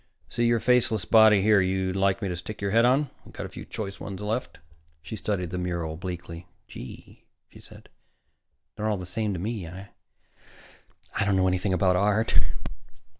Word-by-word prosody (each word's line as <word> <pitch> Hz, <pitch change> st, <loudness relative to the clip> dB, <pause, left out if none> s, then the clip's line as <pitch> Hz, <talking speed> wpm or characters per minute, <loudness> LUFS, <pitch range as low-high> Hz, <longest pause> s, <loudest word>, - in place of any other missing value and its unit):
See 120 Hz, 0 st, +1 dB
any 120 Hz, -1 st, +3 dB
faceless 115 Hz, -5 st, +3 dB
body 110 Hz, -3 st, +6 dB
here 105 Hz, -1 st, +5 dB
you'd 95 Hz, 0 st, 0 dB
like 100 Hz, +1 st, +1 dB
me -, -, 0 dB
to 90 Hz, -, -2 dB
stick 95 Hz, +5 st, -7 dB
your 100 Hz, -1 st, -1 dB
head 115 Hz, +2 st, +5 dB
on? 135 Hz, +2 st, +3 dB
We've -, -, -15 dB
got -, -, -5 dB
a -, -, -7 dB
few -, -, -9 dB
choice 100 Hz, -2 st, -6 dB
ones 95 Hz, -2 st, -6 dB
left." 110 Hz, +4 st, -3 dB, 0.5 s
She -, -, -6 dB
studied 95 Hz, -5 st, -2 dB
the 90 Hz, -, -2 dB
mural 85 Hz, -3 st, -2 dB
bleakly. 85 Hz, -1 st, -7 dB, 0.2 s
"Gee," -, -, -11 dB, 0.2 s
she -, -, -15 dB
said, -, -, -15 dB, 0.9 s
"they're 110 Hz, -, -2 dB
all 105 Hz, -, +1 dB
the 90 Hz, -, -6 dB
same 105 Hz, +4 st, -2 dB
to 90 Hz, -, -4 dB
me. 105 Hz, -2 st, -3 dB
I 95 Hz, +4 st, -9 dB, 1.4 s
don't 100 Hz, -1 st, +2 dB
know 95 Hz, 0 st, +3 dB
anything 95 Hz, +1 st, 0 dB
about 90 Hz, 0 st, +3 dB
art." 105 Hz, +3 st, +3 dB
100 Hz, 180 wpm, -26 LUFS, 90-110 Hz, 1.4 s, body